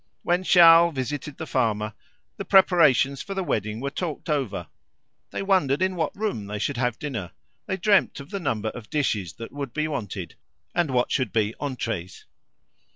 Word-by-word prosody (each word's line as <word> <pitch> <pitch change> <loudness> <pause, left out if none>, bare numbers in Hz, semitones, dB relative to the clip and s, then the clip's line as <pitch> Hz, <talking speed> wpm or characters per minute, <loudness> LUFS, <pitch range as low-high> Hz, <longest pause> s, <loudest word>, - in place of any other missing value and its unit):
When 175 +1 +1
Charles 170 -3 +7
visited 140 +2 -4
the 160 - -5
farmer, 110 -6 0 0.4
the - - -4
preparations 155 -8 +4
for 195 - -6
the 190 - -1
wedding 110 - -2
were 140 +2 -3
talked 165 -1 -4
over; 115 - -1 0.6
they - - -4
wondered 185 -9 +2
in 185 0 0
what 165 +1 -2
room 200 - -2
they 105 +1 -4
should 135 +5 -2
have 125 -2 0
dinner; 120 - -5 0.3
they 190 - -1
dreamed 200 -2 +2
of 140 - -11
the 200 - -3
number 110 - -1
of 110 -2 -10
dishes 105 - -1
that 115 - -9
would 140 -3 -6
be 155 0 -1
wanted, 105 - -5 0.4
and 175 -3 +1
what 125 -2 +1
should 130 - 0
be 110 -1 +1
entrees. 115 -10 -4
140 Hz, 175 wpm, -25 LUFS, 110-170 Hz, 0.6 s, Charles